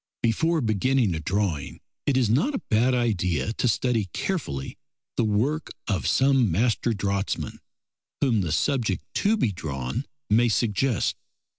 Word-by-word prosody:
Before 160 Hz, +8 st, +2 dB
beginning 115 Hz, -1 st, +2 dB
a 80 Hz, -, -2 dB
drawing, 90 Hz, -2 st, -2 dB, 0.3 s
it 140 Hz, -2 st, +3 dB
is 125 Hz, -3 st, +3 dB
not 150 Hz, -, +2 dB
a -, -, -3 dB
bad 120 Hz, +4 st, +3 dB
idea 105 Hz, -5 st, 0 dB
to 125 Hz, -, 0 dB
study 115 Hz, -4 st, +1 dB
carefully 70 Hz, -, -3 dB, 0.4 s
the -, -, +1 dB
work 120 Hz, +9 st, 0 dB
of 100 Hz, -5 st, 0 dB
some 135 Hz, -4 st, +3 dB
master 115 Hz, +6 st, +1 dB
draughtsman 100 Hz, -1 st, -2 dB, 0.6 s
whom 120 Hz, -7 st, +2 dB
the 85 Hz, -4 st, -2 dB
subject 115 Hz, -, 0 dB
to 215 Hz, +2 st, +2 dB
be 120 Hz, -, +1 dB
drawn 80 Hz, -, -4 dB, 0.2 s
may 115 Hz, +3 st, +4 dB
suggest. 115 Hz, +1 st, +1 dB
115 Hz, 140 wpm, -25 LUFS, 100-130 Hz, 0.6 s, may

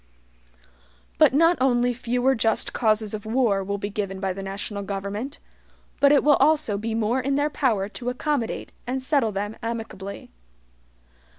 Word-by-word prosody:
But -, -, +7 dB
not 330 Hz, +5 st, +4 dB
only 245 Hz, -1 st, +3 dB
fewer 250 Hz, +2 st, +1 dB
just 225 Hz, -2 st, 0 dB
causes 215 Hz, -2 st, +1 dB
of 210 Hz, -1 st, -4 dB
war 220 Hz, -4 st, +1 dB
will 200 Hz, +1 st, -2 dB
be 200 Hz, +1 st, -4 dB
given 195 Hz, -2 st, -3 dB
by 190 Hz, -1 st, -1 dB
the 195 Hz, -, -7 dB
national 200 Hz, +1 st, -4 dB
government, 200 Hz, +7 st, -4 dB, 0.6 s
but 280 Hz, -, +6 dB
it 290 Hz, -, +5 dB
will 290 Hz, -1 st, +5 dB
also 295 Hz, -6 st, +3 dB
be 220 Hz, +2 st, -3 dB
more 225 Hz, +3 st, +1 dB
in 275 Hz, +2 st, 0 dB
their 290 Hz, +1 st, +1 dB
power 220 Hz, -10 st, +1 dB
to 245 Hz, +3 st, -5 dB
accommodate 250 Hz, -1 st, -2 dB, 0.2 s
and 260 Hz, +2 st, -1 dB
settle 260 Hz, -4 st, +1 dB
them 205 Hz, +2 st, -3 dB
amicably. 225 Hz, -, -6 dB
225 Hz, 160 wpm, -24 LUFS, 200-265 Hz, 0.6 s, But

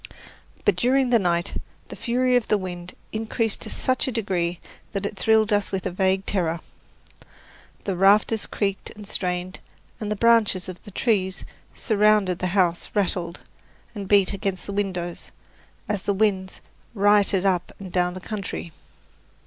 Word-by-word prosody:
But 205 Hz, -, +4 dB
during 255 Hz, +6 st, +2 dB
the 235 Hz, -, +6 dB
night 175 Hz, -2 st, 0 dB, 0.3 s
the -, -, -7 dB
fury 250 Hz, +1 st, +1 dB
of 245 Hz, -3 st, +2 dB
the 210 Hz, -, +3 dB
wind 180 Hz, -2 st, -6 dB, 0.2 s
increased 225 Hz, 0 st, -1 dB
to -, -, -4 dB
such 255 Hz, 0 st, 0 dB
a -, -, 0 dB
degree 180 Hz, -6 st, -1 dB, 0.3 s
that 200 Hz, -1 st, -2 dB
it 205 Hz, -, -3 dB
thrilled 220 Hz, +1 st, +3 dB
us 205 Hz, -1 st, +1 dB
with 190 Hz, -1 st, -2 dB
a -, -, -1 dB
vague 190 Hz, +1 st, +1 dB
terror. 170 Hz, -4 st, 0 dB, 1.2 s
The 195 Hz, -, -2 dB
rafters 205 Hz, +4 st, +4 dB
creaked 195 Hz, -2 st, -2 dB
and 210 Hz, -1 st, -11 dB
strained, 180 Hz, -1 st, -2 dB, 0.4 s
and 210 Hz, -1 st, -3 dB
the -, -, +1 dB
branches 220 Hz, -4 st, +3 dB
of 185 Hz, -1 st, -8 dB
the -, -, -9 dB
trees 195 Hz, -3 st, 0 dB, 0.3 s
surrounding 210 Hz, -4 st, +3 dB
the 185 Hz, -, -1 dB
house 175 Hz, -2 st, +2 dB
rattled 180 Hz, -4 st, -1 dB, 0.5 s
and 200 Hz, -3 st, -6 dB
beat 200 Hz, -1 st, +4 dB
against 195 Hz, -1 st, -3 dB
the 200 Hz, -, -5 dB
windows, 185 Hz, -4 st, -3 dB, 0.6 s
as 205 Hz, -3 st, -1 dB
the 200 Hz, 0 st, 0 dB
winds 190 Hz, -2 st, 0 dB, 0.3 s
rioted 205 Hz, -1 st, +4 dB
up 180 Hz, -2 st, +1 dB
and 190 Hz, -2 st, -9 dB
down 180 Hz, 0 st, +1 dB
the 185 Hz, -, -7 dB
country. 195 Hz, -4 st, -5 dB
195 Hz, 155 wpm, -24 LUFS, 185-215 Hz, 1.2 s, the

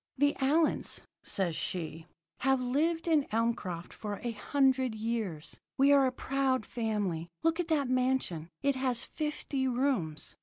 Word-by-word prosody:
"'The 285 Hz, +2 st, +4 dB
Allyns,' 300 Hz, +4 st, +2 dB, 0.2 s
says 180 Hz, -5 st, 0 dB
she, 160 Hz, -1 st, -4 dB, 0.3 s
'have 265 Hz, 0 st, +3 dB
lived 315 Hz, +7 st, 0 dB
in 310 Hz, -4 st, +3 dB
Elmcroft 215 Hz, -6 st, -1 dB
for 205 Hz, -2 st, -5 dB
a 240 Hz, -, -1 dB
hundred 260 Hz, +1 st, +2 dB
years. 215 Hz, -8 st, -3 dB, 0.2 s
We 275 Hz, +1 st, +5 dB
are 275 Hz, -2 st, +6 dB
a -, -, 0 dB
proud 260 Hz, -2 st, 0 dB
family. 205 Hz, -8 st, -2 dB, 0.2 s
Look 330 Hz, +1 st, +2 dB
at 350 Hz, -, 0 dB
that 300 Hz, -5 st, +2 dB
mansion. 255 Hz, -11 st, 0 dB
It 280 Hz, -1 st, +3 dB
has 255 Hz, -2 st, +1 dB
fifty 300 Hz, -3 st, -2 dB
rooms. 245 Hz, -, -1 dB
255 Hz, 145 wpm, -31 LUFS, 210-275 Hz, 0.3 s, are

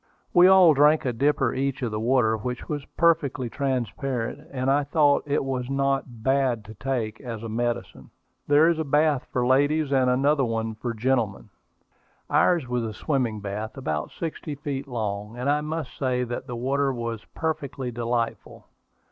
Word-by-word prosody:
We 175 Hz, +1 st, +7 dB
all 185 Hz, -4 st, +7 dB
drank 150 Hz, +2 st, +4 dB
a 125 Hz, -, 0 dB
dipper 135 Hz, 0 st, +1 dB
each 135 Hz, 0 st, -2 dB
of 120 Hz, -, -1 dB
the 105 Hz, -, -2 dB
water, 115 Hz, -1 st, +2 dB
which 125 Hz, +3 st, -5 dB
was 145 Hz, -2 st, -3 dB
perfectly 145 Hz, -7 st, +2 dB
transparent, 130 Hz, -2 st, -2 dB
and 130 Hz, 0 st, 0 dB
I 145 Hz, +1 st, +3 dB
thought 145 Hz, 0 st, +3 dB
it 145 Hz, 0 st, +1 dB
was 130 Hz, -2 st, -3 dB
not 135 Hz, -4 st, -1 dB
"bad 130 Hz, -4 st, +1 dB
to 110 Hz, -, -10 dB
take" 110 Hz, -2 st, -3 dB
as 115 Hz, -4 st, -6 dB
a 115 Hz, -, -5 dB
medicine. 115 Hz, -, -3 dB, 0.4 s
There 145 Hz, +2 st, +5 dB
is 170 Hz, -1 st, +2 dB
a -, -, +1 dB
bath 150 Hz, -1 st, +2 dB
for 125 Hz, -1 st, 0 dB
ladies, 145 Hz, +3 st, +2 dB
and 130 Hz, -2 st, +3 dB
another 135 Hz, +3 st, +2 dB, 0.4 s
for 120 Hz, -2 st, -3 dB
gentlemen. 115 Hz, -3 st, -1 dB, 0.8 s
Ours 170 Hz, -7 st, +3 dB
was 125 Hz, 0 st, -1 dB
a 110 Hz, -2 st, -5 dB
swimming 125 Hz, -8 st, -1 dB
bath, 105 Hz, +4 st, -5 dB
about 75 Hz, -, -3 dB
sixty 160 Hz, -2 st, -5 dB
feet 140 Hz, -1 st, -5 dB
long; 105 Hz, -2 st, -4 dB
and 125 Hz, +2 st, -3 dB
I 145 Hz, +1 st, +2 dB
must 155 Hz, -2 st, -4 dB
say 125 Hz, -2 st, 0 dB
that 120 Hz, +2 st, -5 dB
the 120 Hz, -, -5 dB
water 135 Hz, +3 st, 0 dB
was 115 Hz, -3 st, -4 dB
perfectly 140 Hz, -5 st, -3 dB
delightful. 120 Hz, 0 st, -3 dB
130 Hz, 170 wpm, -25 LUFS, 115-145 Hz, 0.8 s, We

